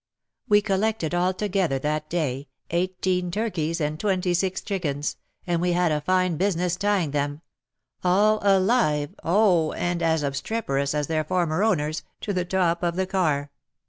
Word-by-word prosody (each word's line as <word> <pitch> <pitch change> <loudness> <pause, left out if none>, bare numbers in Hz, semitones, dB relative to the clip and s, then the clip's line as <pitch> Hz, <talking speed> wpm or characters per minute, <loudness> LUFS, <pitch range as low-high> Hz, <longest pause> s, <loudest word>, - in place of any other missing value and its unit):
We 205 0 +5
collected 200 -4 0
altogether 185 -3 0
that 150 +2 -2
day 145 -5 -2 0.2
eighteen 180 +1 0
turkeys 175 -5 -2
and 155 0 -2
twenty 185 -3 0
six 185 +2 0
chickens, 155 -8 -2 0.3
and 170 -1 0
we 175 0 +1
had 175 -1 +2
a 150 -1 0
fine 185 0 +1
business 180 -1 0
tying 195 -5 0
them 145 +1 -2 0.3
— 130 - -60 0.2
all 205 +4 +3
alive 190 - +2
oh! 175 -3 +3
and 175 0 -2
as 160 -2 +1
obstreperous 140 -1 -1
as 150 -1 0
their 155 +1 0
former 175 +1 0
owners 155 -8 +1
— - - -47
to 205 - -2
the 180 -1 -1
top 175 -2 +1
of 170 -1 0
the 190 +1 0
car. 155 -7 0
175 Hz, 160 wpm, -25 LUFS, 155-190 Hz, 0.3 s, We